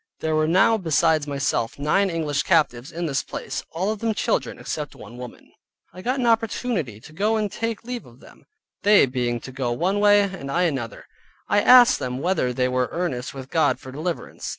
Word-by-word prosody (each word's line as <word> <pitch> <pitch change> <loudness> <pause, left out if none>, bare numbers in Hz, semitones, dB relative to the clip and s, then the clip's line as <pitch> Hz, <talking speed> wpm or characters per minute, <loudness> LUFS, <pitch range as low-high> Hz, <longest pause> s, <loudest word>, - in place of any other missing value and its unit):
There 160 -1 0
were 155 0 +2
now 195 +6 +4
besides 160 -3 +2
myself 140 -5 -1
nine 170 +8 +1
English 155 -4 -1
captives 125 -4 +1
in 170 +1 -4
this 140 -4 0
place - - -6
(all 185 +6 -2
of 215 - -5
them 225 -1 -1
children, - - -1
except 150 -2 -5
one 120 - -12
woman). 125 -1 -11 0.4
I 185 - -10
got 255 +6 -1
an 245 - 0
opportunity 225 - 0
to 155 +7 -15
go 210 +6 +1
and 210 -2 -1
take 230 -1 -3
my - - -11
leave 245 -1 -5
of 120 +1 -18
them. - - -18 0.4
They 205 -3 +6
being 125 -2 -2
to 130 - -9
go 130 -2 -2
one 180 +11 0
way, 205 0 +6
and 190 -8 -5
I 175 +6 +1
another, 135 -9 -3 0.4
I 205 - +3
asked 250 +2 +7
them 125 0 -3
whether 155 -4 0
they 125 +1 0
were 125 0 0
earnest 140 -8 -3
with 135 -1 -9
God 160 -5 +2
for 130 -2 -10
deliverance. 160 +5 -5
160 Hz, 205 wpm, -23 LUFS, 130-205 Hz, 0.4 s, asked